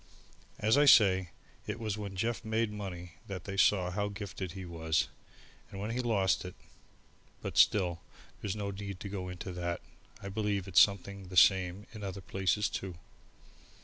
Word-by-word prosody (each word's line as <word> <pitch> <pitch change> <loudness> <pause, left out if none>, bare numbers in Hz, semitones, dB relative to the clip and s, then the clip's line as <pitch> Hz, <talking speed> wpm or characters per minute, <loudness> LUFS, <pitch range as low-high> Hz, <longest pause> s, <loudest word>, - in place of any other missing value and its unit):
As 110 +6 +3
I 145 - +6
say, 95 - +6 0.4
it 105 +2 -3
was 110 -3 -2
when 100 -2 -6
Jeff 115 +3 -1
made 110 -1 0
money 90 -4 -6 0.2
that 95 -4 -5
they 100 - -5
saw 95 -2 +3
how 105 +2 -1
gifted 100 -3 -6
he 95 -1 -7
was, 80 -3 0 0.6
and 95 - -8
when 105 +3 -3
he 120 - -2
lost 105 -6 +2
it, 90 0 -8 0.9
but - - -4
still, 90 -5 +4 0.4
there's 100 -1 -2
no 100 -1 -3
need 100 -1 -6
to 100 - -5
go 95 -2 -4
into 90 +2 -6
that. 85 -1 -3 0.4
I 100 - -8
believe 100 -2 -1
it's 90 -2 +6
something 100 -1 +1
the 90 0 -6
same 95 +1 +5
in 110 -2 -8
other 100 0 -4
places 95 +2 0
too. 95 -2 -5
100 Hz, 175 wpm, -32 LUFS, 90-105 Hz, 0.9 s, I